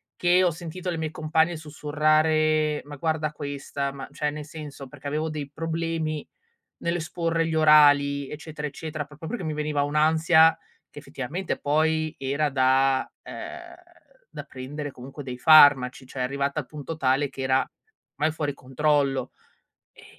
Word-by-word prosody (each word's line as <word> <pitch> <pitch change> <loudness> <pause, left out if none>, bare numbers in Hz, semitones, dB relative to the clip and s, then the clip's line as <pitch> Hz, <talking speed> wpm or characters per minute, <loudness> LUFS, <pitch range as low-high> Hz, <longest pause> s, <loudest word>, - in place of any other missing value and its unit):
che 180 +1 +3
ho 180 - +3
sentito 170 +3 -6
le 170 - -2
mie 160 -1 -3
compagne 160 +2 +1
sussurrare: 155 0 +1
"Ma 145 0 -9
guarda 155 0 -1
questa", 140 -1 -4
ma 135 0 -8
cioè 150 - -1
nel 150 0 -6
senso, 145 -3 -9
perché 145 +1 -10
avevo 155 +2 -1
dei 150 -2 -5
problemi 165 -1 -3 0.5
nell'esporre 165 0 -1
gli 160 - -2
orali, 145 -2 +5
eccetera, 150 0 -6
eccetera, 155 +1 -6
proprio 150 +2 -10
perché 240 -1 -4
mi 155 - -2
veniva 150 -1 -1
un'ansia 160 +2 +4 0.3
che - - -11
effettivamente 145 +5 -4
poi, 155 +1 +1
era 140 +3 0
da 130 0 +2 0.2
uhm, - - -8 0.6
da - - -6
prendere 145 +3 -7
comunque 135 +3 -10
dei 125 -2 -6
farmaci, 135 -3 +6
cioè, 130 - -8
arrivata 140 +3 -1
al 145 - -5
punto 150 +3 -7
tale 135 0 +1
che 135 - -8
era 130 0 +1 0.4
mai 155 +2 +1
fuori 150 -2 -3
controllo. 140 -1 0 0.6
Ehm, - - -18
150 Hz, 150 wpm, -25 LUFS, 140-160 Hz, 0.6 s, farmaci